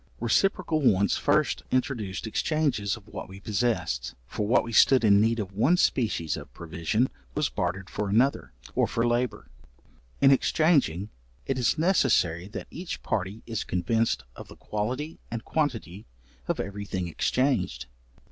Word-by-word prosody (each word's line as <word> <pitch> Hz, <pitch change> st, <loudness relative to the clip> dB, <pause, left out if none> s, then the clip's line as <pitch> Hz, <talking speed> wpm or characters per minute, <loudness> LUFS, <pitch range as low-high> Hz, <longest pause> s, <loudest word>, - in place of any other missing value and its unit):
Reciprocal 160 Hz, -, +1 dB
wants 100 Hz, -7 st, +3 dB
first -, -, +1 dB
introduced 120 Hz, -8 st, -1 dB
exchanges 120 Hz, -4 st, 0 dB
of 110 Hz, -2 st, -17 dB
what 105 Hz, -, -8 dB
we 95 Hz, +1 st, -10 dB
possessed, 100 Hz, -, -1 dB
for 105 Hz, -, -3 dB
what 120 Hz, -, +4 dB
we 115 Hz, -, -7 dB
stood 130 Hz, +3 st, +6 dB
in 100 Hz, -2 st, +6 dB
need 115 Hz, +1 st, +2 dB
of 100 Hz, -3 st, -4 dB
one 130 Hz, -, +3 dB
species 105 Hz, -, +1 dB
of -, -, -9 dB
provision 85 Hz, +9 st, -1 dB, 0.3 s
was -, -, +1 dB
bartered 95 Hz, 0 st, -3 dB
for 105 Hz, 0 st, -3 dB
another, 125 Hz, +7 st, +2 dB, 0.2 s
or -, -, +2 dB
for 115 Hz, -, 0 dB
labour. 120 Hz, -, -1 dB, 0.7 s
In 135 Hz, -, +6 dB
exchanging, 135 Hz, -, +2 dB, 0.3 s
it 135 Hz, -1 st, -1 dB
is 125 Hz, -, +2 dB
necessary 120 Hz, -, +2 dB
that 105 Hz, -, -7 dB
each 175 Hz, +1 st, -6 dB
party 100 Hz, +2 st, -2 dB
is 115 Hz, -3 st, -3 dB
convinced 90 Hz, -, 0 dB
of -, -, -10 dB
the -, -, -13 dB
quality 125 Hz, +9 st, -4 dB
and 115 Hz, -1 st, -5 dB
quantity 115 Hz, -, -2 dB, 0.4 s
of -, -, -1 dB
every 100 Hz, +1 st, -4 dB
thing 95 Hz, -3 st, -3 dB
exchanged. 105 Hz, -, 0 dB
110 Hz, 150 wpm, -27 LUFS, 95-130 Hz, 0.7 s, stood